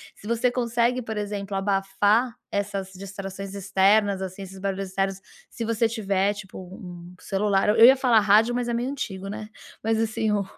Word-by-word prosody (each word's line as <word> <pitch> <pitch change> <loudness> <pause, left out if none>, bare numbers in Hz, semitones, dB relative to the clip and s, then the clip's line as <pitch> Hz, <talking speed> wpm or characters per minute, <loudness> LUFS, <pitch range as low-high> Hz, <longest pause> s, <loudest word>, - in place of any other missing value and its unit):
Se 210 - -12
você 235 +2 +2
consegue, 240 0 0
por 220 -2 -5
exemplo, 205 -1 -4
abafar 205 +4 +1 0.2
essas 200 -1 -2
distrações 195 0 -7
externas, 195 +1 +2
assim, 190 +1 -6
esses 190 0 -10
barulhos 195 0 -3
externos, 195 0 -2 0.3
se 230 - -6
você 230 0 +1
tiver, 200 -3 0
tipo, 205 -2 -10
um 180 -1 -10
celular 195 0 +1
eu 210 - +4
eu 230 - +9
ia 265 - +9
falar 245 -4 +4
rádio, 215 +3 +4
mas 245 -1 -1
é 235 - -1
meio 240 +2 -1
antigo, 195 -9 -5
né. 210 +1 -6 0.4
Mas 225 0 +1
assim, 225 -1 0
o 205 -1 +1
205 Hz, 180 wpm, -25 LUFS, 195-225 Hz, 0.4 s, eu